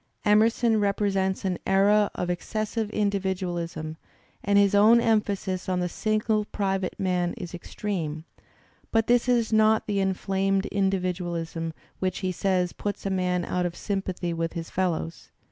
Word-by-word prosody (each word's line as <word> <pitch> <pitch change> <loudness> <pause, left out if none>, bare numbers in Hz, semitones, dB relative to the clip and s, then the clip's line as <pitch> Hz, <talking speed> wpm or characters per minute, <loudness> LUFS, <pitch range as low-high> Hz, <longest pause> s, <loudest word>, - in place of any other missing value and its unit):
Emer 215 +2 +6
son 230 -1 +1
represents 195 -2 0
an 185 -2 -1
era 200 +2 +4
of 180 - -2
excessive 215 +4 -2
individualism, 180 -6 -2 0.5
and 200 0 +3
his 200 -1 +4
own 215 +4 +6
emphasis 205 -5 0
on 180 -1 +1
the 180 - 0
single 215 +3 0
private 195 -3 -2
man 180 -2 0
is 175 -1 -7
extreme, 170 -4 -4 0.7
but 225 -1 +3
this 245 +1 +3
is 235 -2 +2
not 220 0 +4
the 205 -2 -1
^'inflamed 195 0 0
individualism" 180 -4 -1 0.3
which, 185 -1 -1
he 185 - +1
says, 180 -1 0
puts 205 -1 -4
a 195 - 0
man 180 -2 0
out 180 - -1
of 170 - -7
sympathy 190 -4 -3
with 165 0 -2
his 165 -1 -6
fellows. 170 -3 -2
195 Hz, 145 wpm, -26 LUFS, 180-210 Hz, 0.7 s, Emer